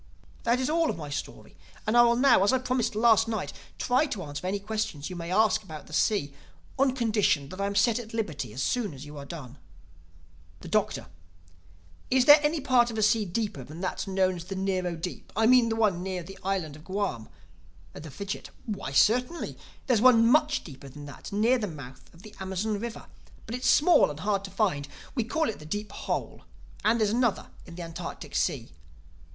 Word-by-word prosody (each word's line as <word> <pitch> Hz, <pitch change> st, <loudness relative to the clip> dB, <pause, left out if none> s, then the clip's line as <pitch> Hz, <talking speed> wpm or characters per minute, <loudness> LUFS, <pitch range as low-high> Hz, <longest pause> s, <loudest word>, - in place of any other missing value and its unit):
"That 235 Hz, +2 st, +3 dB
is 260 Hz, -, 0 dB
all 325 Hz, +1 st, +2 dB
of -, -, -2 dB
my 150 Hz, -3 st, -7 dB
story 145 Hz, -, -6 dB, 0.3 s
and 215 Hz, +1 st, +1 dB
I 240 Hz, -, +8 dB
will 235 Hz, 0 st, +5 dB
now, 250 Hz, -5 st, +5 dB
as 200 Hz, -, +4 dB
I 260 Hz, -, +3 dB
promised 250 Hz, -3 st, -1 dB
last 225 Hz, 0 st, +4 dB
night, 220 Hz, -4 st, -3 dB, 0.2 s
try 255 Hz, +5 st, +2 dB
to 205 Hz, -9 st, -4 dB
answer 145 Hz, +4 st, -5 dB
any 195 Hz, +2 st, 0 dB
questions 210 Hz, -7 st, -3 dB
you -, -, -5 dB
may 170 Hz, -1 st, -6 dB
ask 215 Hz, +3 st, +3 dB
about 155 Hz, -7 st, -10 dB
the 155 Hz, -, -13 dB
sea, 150 Hz, -5 st, +1 dB, 0.5 s
on 265 Hz, -1 st, +3 dB
condition 210 Hz, -, +1 dB
that 185 Hz, +4 st, -6 dB
I 200 Hz, -, +1 dB
am 200 Hz, -, -4 dB
set 230 Hz, +2 st, +3 dB
at 225 Hz, -2 st, -9 dB
liberty 155 Hz, -, -3 dB
as 125 Hz, +5 st, -3 dB
soon 220 Hz, -, -1 dB
as 135 Hz, +2 st, -9 dB
you 150 Hz, 0 st, -10 dB
have 140 Hz, 0 st, -8 dB
done." 140 Hz, -5 st, -9 dB, 1.0 s
The -, -, -9 dB
Doctor: -, -, 0 dB, 1.0 s
"Is 255 Hz, -1 st, +3 dB
there 290 Hz, +2 st, +10 dB
any 305 Hz, +2 st, +1 dB
part 245 Hz, -2 st, +4 dB
of 230 Hz, -, -6 dB
the 215 Hz, -, 0 dB
sea 210 Hz, 0 st, +3 dB
deeper 190 Hz, -, -3 dB
than 155 Hz, +7 st, -10 dB
that 190 Hz, +2 st, -3 dB
known 190 Hz, -1 st, +1 dB
as 170 Hz, -, -8 dB
the 195 Hz, -, -5 dB
Nero 185 Hz, -2 st, -1 dB
Deep—I 180 Hz, +6 st, -3 dB
mean 245 Hz, -1 st, +6 dB
the 225 Hz, -, 0 dB
one 210 Hz, -6 st, +2 dB
near 185 Hz, -1 st, -3 dB
the 195 Hz, +3 st, -11 dB
Island 185 Hz, -6 st, -2 dB
of 155 Hz, -, -14 dB
Guam?" 190 Hz, -, -3 dB, 0.6 s
The 155 Hz, +1 st, -9 dB
Fidgit: 195 Hz, +7 st, -6 dB, 0.2 s
"Why, 200 Hz, -, -4 dB
certainly. 250 Hz, -, +2 dB, 0.3 s
There's 240 Hz, -5 st, +2 dB
one 235 Hz, -2 st, +7 dB
much 300 Hz, +5 st, +3 dB
deeper 140 Hz, -3 st, -11 dB
than 145 Hz, +2 st, -10 dB
that 145 Hz, +7 st, -10 dB
near 225 Hz, +5 st, +3 dB
the 210 Hz, -, -2 dB
mouth 135 Hz, -6 st, -10 dB
of 170 Hz, +3 st, -18 dB
the 215 Hz, -, -12 dB
Amazon 190 Hz, +3 st, -2 dB
River. 235 Hz, +1 st, -6 dB, 0.4 s
But 225 Hz, -, -7 dB
it's 250 Hz, +1 st, 0 dB
small 320 Hz, -, +5 dB
and 150 Hz, +1 st, -7 dB
hard 200 Hz, -1 st, 0 dB
to -, -, -7 dB
find. 180 Hz, -9 st, 0 dB, 0.3 s
We 240 Hz, -5 st, -1 dB
call 315 Hz, +6 st, 0 dB
it 220 Hz, -, -4 dB
'The 150 Hz, -, -11 dB
Deep 205 Hz, +5 st, -4 dB
Hole.' -, -, -4 dB, 0.4 s
And 225 Hz, +2 st, +3 dB
there's 215 Hz, -2 st, +2 dB
another 240 Hz, -2 st, 0 dB, 0.2 s
in 170 Hz, -, -10 dB
the 175 Hz, -, -6 dB
Antarctic 165 Hz, -1 st, -7 dB
Sea." -, -, -1 dB
205 Hz, 210 wpm, -28 LUFS, 170-235 Hz, 1.0 s, there